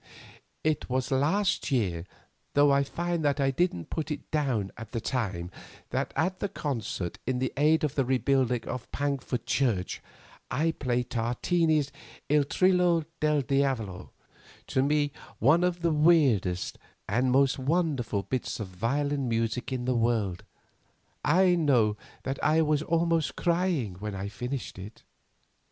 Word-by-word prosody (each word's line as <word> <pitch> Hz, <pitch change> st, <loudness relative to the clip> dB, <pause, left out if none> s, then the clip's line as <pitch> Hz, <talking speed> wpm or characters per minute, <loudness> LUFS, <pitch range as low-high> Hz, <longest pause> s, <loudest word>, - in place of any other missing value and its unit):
"It 155 Hz, -3 st, 0 dB
was 130 Hz, +1 st, -1 dB
last 165 Hz, +9 st, +1 dB
year, 95 Hz, -10 st, 0 dB, 0.5 s
though 145 Hz, 0 st, +6 dB
I 140 Hz, 0 st, +4 dB
find 170 Hz, +3 st, -2 dB
that 145 Hz, 0 st, +1 dB
I 135 Hz, -1 st, +2 dB
didn't 135 Hz, -, -1 dB
put 160 Hz, -1 st, -3 dB
it 150 Hz, -2 st, -6 dB
down 130 Hz, -10 st, 0 dB
at 115 Hz, 0 st, -10 dB
the 115 Hz, -, -1 dB
time, 100 Hz, -8 st, -2 dB, 0.4 s
that -, -, -1 dB
at 185 Hz, 0 st, 0 dB
the 200 Hz, -, -2 dB
concert 115 Hz, -, -4 dB
in 130 Hz, 0 st, 0 dB
aid 155 Hz, +3 st, +3 dB
of 150 Hz, -3 st, 0 dB
the 135 Hz, -, +1 dB
rebuilding 130 Hz, -2 st, +1 dB
of 125 Hz, -1 st, -5 dB
Pankford 135 Hz, -4 st, -2 dB
church 120 Hz, -7 st, 0 dB, 0.5 s
I 155 Hz, +6 st, +1 dB
played 125 Hz, -5 st, -2 dB
Tartini's 145 Hz, +6 st, +1 dB, 0.4 s
'Il 150 Hz, -1 st, +4 dB
Trillo 180 Hz, 0 st, +3 dB
del 150 Hz, -1 st, +2 dB
Diavolo,' 130 Hz, -9 st, -1 dB, 0.6 s
to 130 Hz, -, 0 dB
me 145 Hz, +1 st, +2 dB, 0.3 s
one 155 Hz, +9 st, +4 dB
of 180 Hz, -1 st, 0 dB
the 170 Hz, -, +3 dB
weirdest 140 Hz, -, +3 dB, 0.3 s
and 125 Hz, +1 st, +1 dB
most 135 Hz, +1 st, +3 dB
wonderful 135 Hz, -, 0 dB
bits 130 Hz, +1 st, -3 dB
of 105 Hz, -4 st, -5 dB
violin 135 Hz, +7 st, -1 dB
music 115 Hz, +3 st, -1 dB
in 125 Hz, -2 st, -2 dB
the 130 Hz, -, +1 dB
world. 115 Hz, -6 st, 0 dB, 0.8 s
I 180 Hz, +4 st, +4 dB
know 130 Hz, -11 st, +3 dB, 0.3 s
that 135 Hz, 0 st, -4 dB
I 160 Hz, +1 st, +4 dB
was 150 Hz, -1 st, +1 dB
almost 165 Hz, -1 st, +1 dB
crying 170 Hz, -, 0 dB
when 105 Hz, 0 st, -4 dB
I 95 Hz, +1 st, -4 dB
finished 125 Hz, 0 st, -5 dB
it. 100 Hz, +4 st, -10 dB
135 Hz, 145 wpm, -28 LUFS, 115-155 Hz, 0.8 s, though